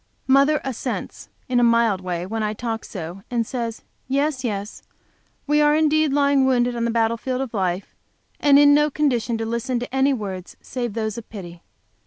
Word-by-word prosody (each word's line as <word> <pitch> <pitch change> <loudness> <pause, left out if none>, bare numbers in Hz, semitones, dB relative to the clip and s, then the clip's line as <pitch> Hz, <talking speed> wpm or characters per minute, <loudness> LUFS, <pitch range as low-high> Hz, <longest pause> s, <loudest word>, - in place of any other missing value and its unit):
Mother 280 +3 +4
assents, 265 -4 -5 0.2
in 250 -1 +2
a - - +3
mild 230 -4 +3
way, 180 -1 -3
when 220 +4 -3
I 215 0 -1
talk 225 0 -4
so 180 0 -7
and 235 -2 0
says, 230 -2 -4 0.2
"Yes, 275 0 0
yes, 205 -3 -4 0.6
we 300 +1 +3
are 295 0 +4
indeed 310 -1 +3
lying 280 -1 +3
wounded 245 -1 +2
on 235 0 -1
the - - 0
battle 230 0 +1
field 255 +2 -3
of 265 -3 -4
life, 185 -2 -2 0.5
and 285 -1 +5
in 290 0 +7
no 295 +1 +4
condition 245 -6 0
to 225 - -3
listen 235 +2 -2
to 245 +2 -6
any 265 +1 +3
words 195 -7 -5
save 240 -4 -4
those 220 0 -2
of 225 - -14
pity. 175 -5 -9
240 Hz, 190 wpm, -22 LUFS, 220-275 Hz, 0.6 s, in